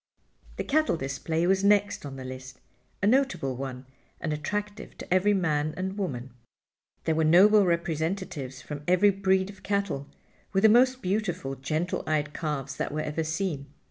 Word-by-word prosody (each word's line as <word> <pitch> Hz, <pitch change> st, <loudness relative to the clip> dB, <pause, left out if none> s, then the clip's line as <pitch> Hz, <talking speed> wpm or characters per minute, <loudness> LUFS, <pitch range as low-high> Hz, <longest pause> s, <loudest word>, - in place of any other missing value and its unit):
The -, -, -3 dB
cattle 310 Hz, -, +2 dB
display 160 Hz, +4 st, -2 dB
was 190 Hz, +1 st, +2 dB
next 205 Hz, -5 st, +2 dB
on 135 Hz, -, -8 dB
the 130 Hz, -1 st, -8 dB
list—a 130 Hz, +3 st, -9 dB
notable 245 Hz, -, +2 dB
one, 130 Hz, 0 st, -6 dB, 0.3 s
and 155 Hz, -2 st, -2 dB
attractive 205 Hz, +7 st, -4 dB
to -, -, -3 dB
every 200 Hz, +3 st, +4 dB
man 155 Hz, -4 st, 0 dB
and 190 Hz, +1 st, -3 dB
woman. 135 Hz, -11 st, -4 dB, 0.7 s
There 160 Hz, -, +1 dB
were 160 Hz, 0 st, +1 dB
noble 195 Hz, +5 st, +6 dB
representatives 165 Hz, -5 st, -2 dB
from 145 Hz, -1 st, -6 dB
every 185 Hz, +3 st, +5 dB
breed 190 Hz, 0 st, +1 dB
of 195 Hz, -2 st, -17 dB
cattle, 200 Hz, -9 st, -1 dB, 0.5 s
with 195 Hz, +1 st, +2 dB
the 220 Hz, -, +8 dB
most 255 Hz, +3 st, +4 dB
beautiful, 185 Hz, -7 st, -1 dB
gentle 155 Hz, +6 st, -2 dB
eyed 150 Hz, -1 st, 0 dB
calves 140 Hz, -4 st, -3 dB
that -, -, -2 dB
were 155 Hz, +1 st, -2 dB
ever 155 Hz, +1 st, -2 dB
seen. 160 Hz, -3 st, -2 dB
170 Hz, 160 wpm, -27 LUFS, 145-200 Hz, 0.7 s, the